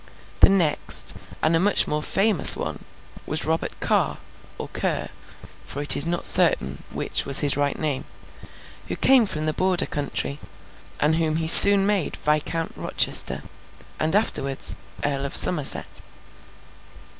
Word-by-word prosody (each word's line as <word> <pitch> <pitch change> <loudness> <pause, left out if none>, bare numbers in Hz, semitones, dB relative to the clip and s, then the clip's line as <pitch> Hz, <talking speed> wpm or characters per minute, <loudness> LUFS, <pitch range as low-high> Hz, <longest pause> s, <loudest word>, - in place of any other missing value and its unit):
The - - +4
next, 175 -7 -1 0.3
and 160 +1 -1
a - - -1
much 205 +4 -1
more 150 0 -5
famous 195 +1 +4
one, - - -9 0.4
was 155 - -3
Robert 160 +1 -6
Carr, - - -3 0.4
or - - -10
Ker - - -5 0.5
(for 140 - -10
it 145 - +2
is 145 - +1
not 175 0 -6
certain 65 +1 +1
which - - -3
was 140 - +6
his 145 -2 0
right 145 0 -4
name), 145 -4 -6 0.8
who - - -7
came 260 -5 +1
from 155 -4 -7
the 155 - -4
Border 185 0 -2
country, 145 -1 -7 0.6
and 155 +2 -2
whom 160 -2 -3
he 160 0 -5
soon 200 +3 +10
made 200 -5 -4
Viscount 155 +2 -5
Rochester, - - 0 0.6
and 160 +4 -4
afterwards, 140 -10 -1 0.3
Earl 140 -1 -3
of 140 - -3
Somerset. 150 -6 +2
155 Hz, 145 wpm, -19 LUFS, 145-180 Hz, 0.8 s, soon